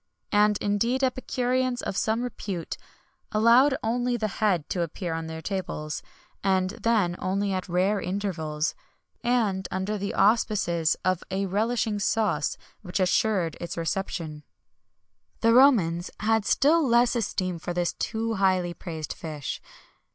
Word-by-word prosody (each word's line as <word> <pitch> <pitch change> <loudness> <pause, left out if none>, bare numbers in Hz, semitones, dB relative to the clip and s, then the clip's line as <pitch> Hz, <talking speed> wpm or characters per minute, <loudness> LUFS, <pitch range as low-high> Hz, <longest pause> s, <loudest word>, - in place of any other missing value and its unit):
[XXI - - -21
117] 205 - +4 0.3
And, 205 - +2
indeed, 240 +6 +1
epicureans 255 -1 0
of - - -3
some 220 +4 0
repute 195 -8 -4 0.6
allowed 240 +6 +5
only 245 +2 0
the 215 -2 -1
head 185 -8 +2
to 180 - -1
appear 170 +1 -3
on 165 0 -4
their 160 0 -7
tables;[XXI 170 -6 -6
118] 190 0 +1
and 230 - -16
then 210 -7 +2
only 195 +1 -1
at 185 0 -3
rare 190 +4 +1
intervals, 165 -6 -2 0.5
and 220 -6 +1
under 195 +3 -2
the 200 +1 -3
auspices 195 -6 +2
of 185 -1 +1
a 195 +1 -1
relishing 215 +2 0
sauce 200 -7 0 0.2
which 180 -1 -3
assured 185 -3 +2
its 170 - -5
reception. 165 -2 -3 1.0
The 230 0 +5
Romans 195 -10 +4
had 220 0 +2
still 315 +5 +4
less 240 -1 +3
esteem 185 -6 -1
for 175 - -4
this 175 0 0
too 225 +1 -2
highly 185 -3 +1
praised 160 -3 -6
fish. 150 -4 -6
195 Hz, 145 wpm, -26 LUFS, 175-230 Hz, 1.0 s, allowed